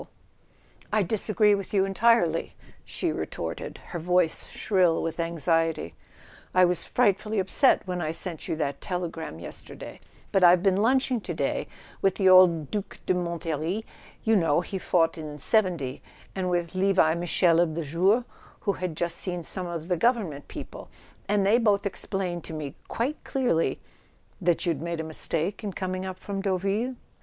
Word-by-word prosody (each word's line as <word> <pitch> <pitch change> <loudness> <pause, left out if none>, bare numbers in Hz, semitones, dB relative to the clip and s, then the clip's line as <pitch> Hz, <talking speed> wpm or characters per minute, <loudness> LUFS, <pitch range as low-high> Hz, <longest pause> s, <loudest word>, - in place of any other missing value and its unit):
A - - -8
SON - - -24
AT - - -37
THE - - -31
FRONT - - -32
"I 215 -1 +3
disagree 210 +2 +2
with 200 0 -3
you 195 -1 +4
entirely," 195 -4 +2 0.3
she - - -2
retorted, - - -5
her 175 - -4
voice 180 0 +1
shrill 180 -5 +1
with 165 +1 -4
anxiety. 165 - 0 0.6
"I 185 0 +7
was 175 -1 0
frightfully 215 -2 +1
upset 195 +8 +3
when 180 -1 -3
I 155 -2 -1
sent 165 0 -4
you - - -1
that 140 -3 -3
telegram 170 - -4
yesterday; 85 - -9 0.3
but 195 - +3
I've 175 0 +7
been 195 -2 +3
lunching 255 +2 +2
to - - -5
day - - -1 0.3
with 195 -1 +2
the 195 - +2
old 180 -5 +6
Due 205 -2 -1 0.2
de - - +2
Montlhery—you 170 +6 -3
know 165 -4 +3
he 190 +1 -5
fought 165 -2 +1
in 150 -1 -7
'seventy—and 180 - -1
with 175 -1 -1
Levi 185 -4 +3
Michel 170 0 +2
of 165 -3 +2
the 170 - -2
'Jour,' 185 - +2 0.4
who 200 - 0
had 180 -5 -4
just 170 -1 -1
seen 180 -2 -3
some 180 +2 -2
of 170 -2 -5
the 180 -2 0
govern¬ 235 -3 +3
ment 140 0 -10
people; - - -9 0.4
and 205 -1 +2
they 220 +4 +5
both 205 -3 +2
explained 190 -3 -3
to - - -7
me 150 -3 -5
quite 265 +7 -2
clearly 250 - 0 0.3
" - - -35
"That 175 0 +1
you'd 165 -5 0
made 170 0 -3
a - - -2
mistake 160 +5 -2
in 200 -2 -3
coming 185 0 -3
up 185 -1 -6
from 200 -1 -5
Deauville 200 +6 -1
180 Hz, 175 wpm, -26 LUFS, 165-200 Hz, 0.6 s, I